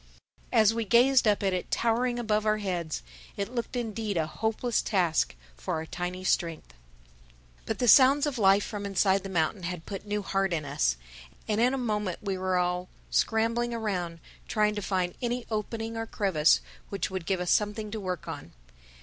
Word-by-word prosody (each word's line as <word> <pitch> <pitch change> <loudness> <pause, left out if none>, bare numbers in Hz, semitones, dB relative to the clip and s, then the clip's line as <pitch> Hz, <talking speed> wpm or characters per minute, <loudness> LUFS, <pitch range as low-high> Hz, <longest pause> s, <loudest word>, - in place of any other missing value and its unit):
As 220 -2 +5
we 230 0 -1
gazed 245 +4 +5
up 205 -1 +2
at 195 -1 +1
it 180 - -3
towering 240 +1 +1
above 215 -3 0
our 215 0 +2
heads, 175 - -3 0.3
it 200 +4 -3
looked 235 +1 -3
indeed 220 -4 -2
a 160 - +1
hopeless 220 +8 -1
task 175 - +1 0.2
for - - -3
our 160 - -3
tiny 180 +2 -4
strength. 165 - -1 0.9
But - - -1
the 245 - 0
sounds 275 +5 +7
of 280 -5 -2
life 195 0 +5
from 205 -2 -5
inside 195 0 +2
the 195 - -7
mountain 175 +2 0
had 175 -1 -5
put 200 0 -7
new 205 0 -1
heart 195 -1 0
in 155 -3 -2
us. 135 - 0 0.5
And 215 +1 +1
in 250 +3 +3
a - - -2
moment 210 -7 -1
we 195 -2 -1
were 185 0 0
all 180 0 -1 0.2
scrambling 230 +2 +1
around 180 -7 -3 0.3
trying 210 -1 +2
to 210 - -3
find 185 -2 -1
any 245 0 -2
opening 225 +1 -3
or 225 0 -3
crevice 185 -9 +3 0.3
which 195 -2 -3
would 185 -3 -5
give 190 -2 +1
us 180 -1 0
something 210 0 0
to 220 - -4
work 185 -4 -4
on. - - -7
205 Hz, 185 wpm, -28 LUFS, 180-225 Hz, 0.9 s, sounds